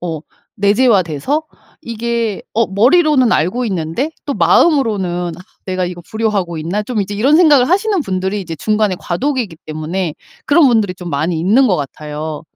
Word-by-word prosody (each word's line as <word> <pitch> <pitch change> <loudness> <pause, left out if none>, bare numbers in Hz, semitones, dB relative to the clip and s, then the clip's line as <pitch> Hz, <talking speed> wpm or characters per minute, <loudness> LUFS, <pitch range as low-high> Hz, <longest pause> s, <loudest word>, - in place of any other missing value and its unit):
어 165 -4 -4 0.4
내재화돼서 205 - +2 0.4
이게 230 -2 -3
어 230 0 +2
머리로는 260 - +3
알고 185 +11 0
있는데 190 - -2
또 285 - -2
마음으로는 185 - +2
'아 - - -12 0.3
내가 185 -1 -1
이거 175 0 -6
불효하고 210 -6 -1
있나?' 175 +7 -2
좀 225 0 -2
이제 200 +1 -6
이런 270 +9 +3
생각을 295 -7 +5
하시는 395 +1 +1
분들이 190 -3 -2
이제 165 -4 -6
중간에 215 +1 0
과도기기 235 - -2
때문에 155 +2 -3 0.3
그런 295 +1 +5
분들이 220 -7 +2
좀 180 -2 -8
많이 160 +4 -1
있는 215 +11 +3
것 190 -6 +2
같아요. 150 +2 -6
200 Hz, 360 characters per minute, -16 LUFS, 175-250 Hz, 0.4 s, 생각을